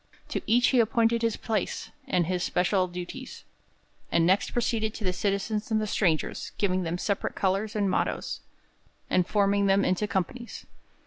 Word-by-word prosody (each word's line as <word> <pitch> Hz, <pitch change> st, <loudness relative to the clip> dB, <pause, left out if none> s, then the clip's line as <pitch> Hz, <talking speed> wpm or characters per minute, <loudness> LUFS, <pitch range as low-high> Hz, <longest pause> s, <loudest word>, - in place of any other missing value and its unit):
To -, -, -2 dB
each 240 Hz, +3 st, +4 dB
he 255 Hz, -, +3 dB
appointed 230 Hz, 0 st, +3 dB
his 230 Hz, -2 st, 0 dB
place, 215 Hz, -4 st, -2 dB, 0.2 s
with 180 Hz, -2 st, +3 dB
his 180 Hz, +1 st, -1 dB
special 185 Hz, +1 st, +1 dB
duties, 180 Hz, +9 st, -7 dB, 0.7 s
and 165 Hz, -, +3 dB
next 190 Hz, +3 st, +3 dB
proceeded 225 Hz, -2 st, 0 dB
to 220 Hz, -, -6 dB
the 185 Hz, -2 st, +1 dB
citizens 205 Hz, +3 st, -1 dB
and 220 Hz, -1 st, +2 dB
the 215 Hz, -, -1 dB
strangers, 175 Hz, -6 st, 0 dB
giving 185 Hz, -2 st, +1 dB
them 170 Hz, 0 st, -2 dB
separate 200 Hz, +2 st, -2 dB
colours 200 Hz, +3 st, 0 dB
and 205 Hz, -2 st, +1 dB
mottoes, 185 Hz, -, -1 dB, 0.7 s
and 180 Hz, -1 st, +3 dB
forming 200 Hz, -1 st, +2 dB
them 195 Hz, +1 st, +4 dB
into 185 Hz, +3 st, +1 dB
companies. 225 Hz, +6 st, -3 dB
200 Hz, 165 wpm, -27 LUFS, 185-220 Hz, 0.7 s, each